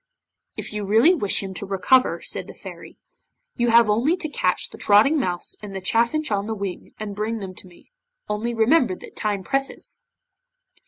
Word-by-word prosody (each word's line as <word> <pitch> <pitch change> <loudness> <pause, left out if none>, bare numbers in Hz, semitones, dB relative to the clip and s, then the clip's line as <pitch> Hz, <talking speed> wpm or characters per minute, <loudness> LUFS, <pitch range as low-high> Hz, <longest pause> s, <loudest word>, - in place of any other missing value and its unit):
'If - - -6
you 210 -1 -3
really 225 - +5
wish 205 - 0
him 190 -1 -6
to 200 - -4
recover,' 225 +7 +2
said - - -3
the - - -11
Fairy, - - -11 0.6
'you 240 -1 +1
have 230 -1 +6
only 240 - +2
to 315 -4 -3
catch - - -1
the - - -11
Trotting 220 +10 +4
Mouse 180 -8 -1
and 205 -2 -8
the - - -2
Chaffinch 235 +9 0
on 200 0 0
the 225 - -2
Wing 195 -3 -6
and 210 -2 -5
bring 215 +2 -2
them 190 -3 -7
to 185 - -13
me. 180 - -20 0.4
Only 225 +3 -2
remember 230 - +3
that - - -13
time 205 -3 -2
presses! 275 +3 -3
215 Hz, 190 wpm, -23 LUFS, 200-245 Hz, 0.6 s, have